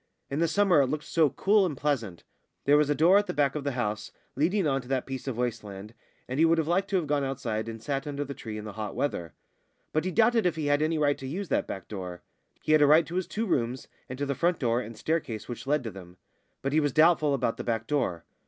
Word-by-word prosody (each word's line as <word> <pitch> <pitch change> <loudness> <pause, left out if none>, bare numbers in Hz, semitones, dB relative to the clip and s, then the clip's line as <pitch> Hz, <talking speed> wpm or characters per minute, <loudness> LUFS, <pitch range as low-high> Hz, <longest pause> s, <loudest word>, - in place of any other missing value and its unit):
In 140 - -1
the 170 - +3
summer 180 -2 +4
it 135 - +2
looked 150 +3 -3
so 160 -1 +2
cool 200 +9 +3
and 160 -7 -2
pleasant. 115 - -2 0.4
There 145 - +5
was 150 -1 +3
a 145 - +2
door 175 +7 +6
at 205 - -2
the - - -4
back 140 -2 +2
of 150 - -4
the 140 -1 -1
house, 110 -3 -3 0.2
leading 185 +5 +1
on 135 -2 +1
to 125 - -15
that 130 -1 -1
piece 135 0 -6
of 130 -4 -3
waste 120 -2 -2
land, 100 +1 -9 0.3
and 130 +3 -3
he - - +6
would 165 0 +4
have 160 -2 0
liked 190 +4 +1
to 200 - -1
have 180 -4 +1
gone 145 -1 0
outside 115 -5 -3
and 115 0 -8
sat 135 +2 -2
under 145 0 -3
the 140 - -6
tree 110 -5 -7
in 105 - -7
the 105 - -7
hot 105 -1 -5
weather. 85 - -2 0.6
But 155 - +1
he 185 - -1
doubted 225 +2 +3
if 170 - 0
he 155 -2 -3
had 145 0 +2
any 160 +1 +1
right 145 -1 +1
to 135 - -6
use 180 +6 -4
that - - 0
back 95 - -6
door. 90 -4 -7 0.4
He - - 0
had 155 -1 +6
a 145 - +6
right 155 +3 +6
to 170 - -9
his 185 -1 -1
two 225 +2 -2
rooms 125 - -1 0.2
and 130 - -6
to 145 - -1
the 140 - -1
front 170 +5 +1
door 120 -2 +1
and 115 -1 -9
staircase 120 -8 -2
which 120 +2 -7
led 145 -1 +1
to 115 - -5
them; 90 -2 -12 0.5
but 135 +1 -1
he 155 - +4
was 145 -3 0
doubtful 155 -3 +4
about 120 -3 -1
the - - -5
back 115 -2 -1
door. 115 - -1
140 Hz, 275 wpm, -28 LUFS, 115-160 Hz, 0.6 s, door